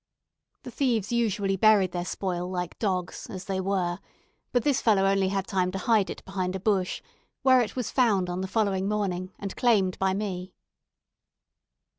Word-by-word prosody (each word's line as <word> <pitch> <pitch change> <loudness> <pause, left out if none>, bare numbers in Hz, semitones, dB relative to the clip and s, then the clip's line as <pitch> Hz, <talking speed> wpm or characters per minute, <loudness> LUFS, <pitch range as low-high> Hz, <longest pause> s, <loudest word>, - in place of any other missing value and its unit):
The - - -8
thieves 235 -8 0
usually 210 -4 +1
buried 200 -2 +4
their 175 0 -3
spoil 180 -1 -3
like 180 -2 -4
dogs, 185 -4 -2
as 185 -1 -7
they 190 -1 -2
were; 185 -2 -1 0.5
but 245 -2 +1
this 280 -1 +2
fellow 205 -4 +3
had 195 - +4
only 195 0 +1
time 185 -2 0
to - - -2
hide 210 0 +2
it - - -7
behind 185 -1 -3
a - - -3
bush, 190 -2 0 0.4
where 260 -1 +6
it 225 - -3
was 250 -4 -3
found 210 -8 +2
on 180 +1 -3
the 190 - -3
following 195 -2 0
morning, 185 -3 -2
and 195 -1 -6
claimed 200 -7 +2
by 190 0 +1
me. 185 -3 -4
195 Hz, 175 wpm, -27 LUFS, 185-215 Hz, 0.5 s, where